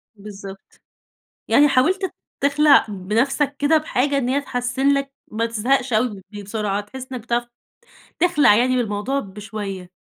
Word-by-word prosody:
بالضبط. 200 -1 -11 0.7
يعني 295 +1 +5
حاولت 365 +9 +1 0.3
تخلع 285 0 +5
بنفسك 230 +9 0
كده 300 +2 +4
بحاجة 285 -2 0
إن 250 -2 -1
هي 280 +2 +1
تحسن 250 0 -2
لك 275 0 -1 0.2
ما 225 +2 -1
تزهقش 245 +3 0
أوي 215 -3 0
بي 205 -1 -9
بسرعة، 205 0 -2
تحس 260 +5 -10
إنّك 250 -2 -5
بتعرف 240 +1 -2 0.7
تخلع 300 -11 +5
يعني 255 +3 +2
بالموضوع 230 +3 -1
بشوية. 200 -3 -7
245 Hz, 135 wpm, -21 LUFS, 210-275 Hz, 0.7 s, يعني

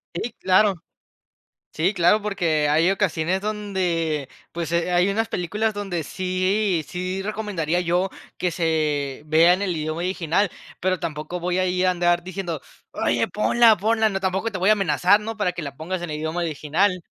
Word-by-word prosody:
Sí, 235 +7 -3
claro. 190 +2 +4 1.0
Sí, 180 +6 +1
claro, 180 +4 +3
porque 170 -8 0
hay 165 +5 +4
ocasiones 185 -2 0
donde 180 -8 -1 0.2
pues, 170 -1 -4
eh, 170 +1 +1
hay 175 +2 +3
unas 220 +2 0
películas 210 +5 -1
donde 195 -5 -3
sí 185 +1 0
sí, 185 +2 -3
recomendaría 195 -6 -2
yo 180 +2 +1 0.3
que 180 -2 0
se 150 -5 -1
vea 160 +3 +5
en 185 - -2
el 185 -4 -1
idioma 155 +2 -3
original, 180 +1 0 0.3
pero 185 0 +1
tampoco 155 +3 -4
voy 180 +1 -1
a 185 - +2
ir 185 0 +1
a - - +4
andar 175 -1 +1
diciendo: 180 -4 -5 0.3
"Oye, 115 -1 0
ponla, 225 +1 +4
ponla", 220 +2 +2
¿no? 195 -1 -2
Tampoco 190 +4 -1
te 190 - -4
voy 190 +3 +2
a - - +8
amenazar, 200 0 +3
¿no?, 225 +1 -5
para 185 -4 0
que 175 - -5
la 140 -3 -6
pongas 175 +3 -4
en 175 - -5
el 150 - -3
idioma 160 +3 -3
original. 170 +4 0
180 Hz, 180 wpm, -23 LUFS, 165-195 Hz, 1.0 s, a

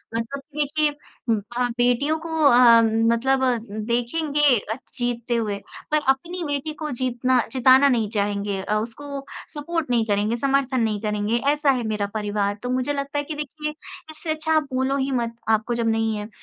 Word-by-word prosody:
मतलब 235 +5 -3 0.2
देखिए 300 +1 +1 0.4
अ, 240 +3 -1
बेटियों 245 +6 +2
को 330 +1 -8 0.2
अम, 235 -3 +7 0.2
मतलब 265 +3 +2 0.5
देखेंगे 285 +6 0 0.6
जीतते 240 -1 -1
हुए 210 -3 -1 0.3
पर 305 - +4
अपनी 340 +6 0
बेटी 290 +1 -2
को 305 - -3
जीतना 255 0 +1
जिताना 260 +2 +6
नहीं 225 -5 +1
चाहेंगे, 200 -2 -1
अ, 210 +2 -1
उसको 275 +6 -5 0.3
सपोर्ट 310 0 -3
नहीं 235 -2 +2
करेंगे, 210 +1 +1
समर्थन 270 0 +1
नहीं 215 -2 0
करेंगे, 210 +1 0
ऐसा 295 -1 +2
है 250 -3 -1
मेरा 210 -2 -1
परिवार। 205 -1 -1
तो 245 - -3
मुझे 255 +3 0
लगता 280 +1 -3
है - - -1
कि 310 - -5
देखिए 300 +1 -4 0.4
इससे 315 +1 -8
अच्छा 315 +1 -1
आप 310 -1 +3
बोलो 265 +2 +1
ही 275 0 -1
मत, 235 -2 -1
आपको 220 +2 +1
जब 235 -1 0
नहीं 225 0 +1
है। 210 0 -5
250 Hz, 170 wpm, -23 LUFS, 225-285 Hz, 0.6 s, अम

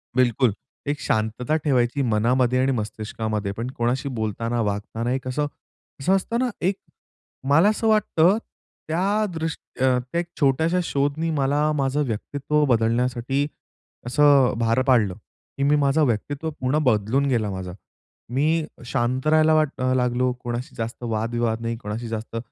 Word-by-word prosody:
बिलकुल. 125 -2 +3 0.3
एक 145 0 -1
शांतता 115 +3 0
ठेवायची 130 -2 +1
मनामध्ये 125 +2 +2
आणि 135 +1 +2
मस्तिष्कामध्ये 110 -2 -3
पण 115 +4 -4
कोणाशी 125 +4 0
बोलताना, 115 0 -2
वागताना 110 +3 -2
एक 130 -1 -3
असं, 145 +3 -1 0.5
असं 185 +8 +3
असतं 230 +5 -1
ना, 255 -1 +1
एक 190 +3 +1 0.7
मला 165 +8 +6
असं 220 +1 0
वाटतं, 210 -3 +3 0.5
त्या 195 +6 +1
दृष्टी 160 -4 -4
अ, 130 -1 +4
त्या 130 +7 -3
एक 175 - -9
छोट्याशा 160 +5 +2
शोधनी 145 +3 -1
मला 145 +1 +1
माझं 140 +1 +1
व्यक्तित्व 140 +6 -1
बदलण्यासाठी, 125 +3 +1 0.6
असं 140 0 +4
भार 115 +2 +2
पाडलं. 115 -7 +4 0.4
की 140 - -1
मी 145 +1 +4
माझा 145 +1 +2
व्यक्तित्व 145 +5 -1
पूर्ण 130 +3 +1
बदलून 120 +3 +2
गेला 115 -5 +1
माझा. 95 -1 -5 0.6
मी 155 +5 +1 0.2
शांत 130 +2 -1
राहायला 155 0 +5
वाट 155 -2 +3
अ, 130 0 +2
लागलो. 125 0 +1
कोणाशी 120 +4 -4
जास्त 115 +2 -5
वादविवाद 115 0 -1
नाही, 115 0 -2
कोणाशी 115 +1 -5
जास्त 115 +1 -5
130 Hz, 145 wpm, -23 LUFS, 115-150 Hz, 0.7 s, मला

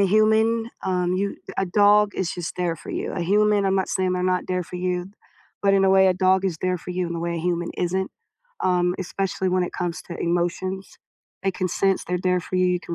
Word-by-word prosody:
a 195 - +4
human, 220 +3 +3
um, 180 -1 0
you 200 +1 -1 0.2
a 195 - +1
dog 205 +2 +4
is 185 -2 -2
just 175 -2 -5
there 175 -2 0
for - - -14
you, - - -3
a 175 - -3
human, 205 +3 +3
I'm 190 - +2
not 190 -1 0
saying 185 -1 0
they're 180 0 -1
not 185 0 0
there 180 0 0
for 180 - -8
you, 180 +1 -2 0.5
but 195 0 +4
in 195 0 +4
a 190 - +4
way 190 0 +6
a 185 - +3
dog 190 +1 +3
is 170 -4 -2
there 185 -1 0
for 180 - -8
you 180 -1 -1
in 170 - -4
a - - -4
way 170 0 -2
a - - -2
human 175 0 -1
isn't, 190 +2 -1 0.5
um, 180 -1 +2
especially 190 0 -2
when 185 0 +2
it - - -6
comes 175 -1 -3
to 170 - -8
emotions. 175 +3 -2 0.5
They 195 - +1
can 185 0 -2
sense 195 +2 +1
they're 180 +1 -1
there 180 -1 +2
for 185 - -4
you; 185 - +3
you 180 -1 +1
can 170 - -6
185 Hz, 245 wpm, -23 LUFS, 180-195 Hz, 0.5 s, way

